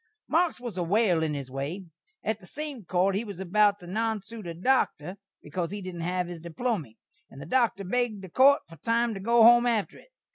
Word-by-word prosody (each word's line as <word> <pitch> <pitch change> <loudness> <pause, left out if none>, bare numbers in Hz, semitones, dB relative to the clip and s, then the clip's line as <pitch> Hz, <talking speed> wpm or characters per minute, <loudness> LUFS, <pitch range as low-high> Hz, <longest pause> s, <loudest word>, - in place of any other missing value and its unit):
Marks 335 -2 +1
was 235 -7 -6
a - - +1
whale 185 -2 +2
in 155 -2 -1
his 135 -2 -6
way. 145 +9 -4 0.4
At 220 0 -1
the 185 - -15
same 290 -6 -6
court 185 +3 +1
he 200 +4 -1
was 200 -5 -8
about 205 +2 +3
to - - -11
nonsoot 220 +1 -3
a 170 - -5
Doktor 185 - 0 0.3
bekaus 165 +3 -3
he 205 - -5
didn't 185 -3 -7
hav 180 +1 -1
his 175 -1 -7
diplomy, 170 - -3 0.3
and 135 - -13
the - - -8
Doktor 240 -6 +1
begged 220 0 -1
the 190 - -9
court 275 +9 +5
for 165 0 -14
time 230 +6 0
to 195 - -6
go 230 +3 +4
home 240 +1 +7
after 225 -4 -1
it. - - -20
200 Hz, 215 wpm, -27 LUFS, 175-235 Hz, 0.4 s, home